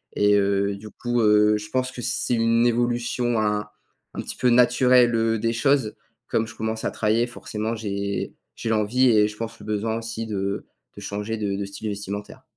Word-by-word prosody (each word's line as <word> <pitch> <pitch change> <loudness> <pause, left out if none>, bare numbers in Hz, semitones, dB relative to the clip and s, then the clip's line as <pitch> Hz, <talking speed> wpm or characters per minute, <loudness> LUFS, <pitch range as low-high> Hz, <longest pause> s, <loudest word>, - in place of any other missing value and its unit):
et 105 0 +4
heu, 100 0 +1
du 105 +2 -10
coup, 120 -1 -1
heu, 105 0 +5
je 105 0 -8
pense 130 +2 -1
que 125 - -7
c'est 120 0 0
une 115 +1 +3
évolution 120 0 0
un 105 -1 0 0.5
un - - -3
petit - - -6
peu 125 - +2
naturelle, 125 0 +5
heu, 115 -1 +1
des 115 +1 0
choses. 125 -1 +1 0.3
Comme 115 - 0
je 115 - -10
commence 110 0 -3
à - - 0
travailler 110 +2 +1
forcément, 110 -2 -4
j'ai 100 -2 -3 0.2
j'ai 115 - -4
l'envie 110 +4 +3
et 105 -2 +5
je 105 - -10
pense 115 0 -6
le - - -12
besoin 110 +1 -1
aussi 115 0 -5
de 100 -1 -3 0.3
de - - -10
changer 105 +2 -4
de 100 -2 -2
de 100 0 -3
style 100 +2 -6
vestimentaire. 100 0 -6
110 Hz, 195 wpm, -24 LUFS, 105-120 Hz, 0.5 s, heu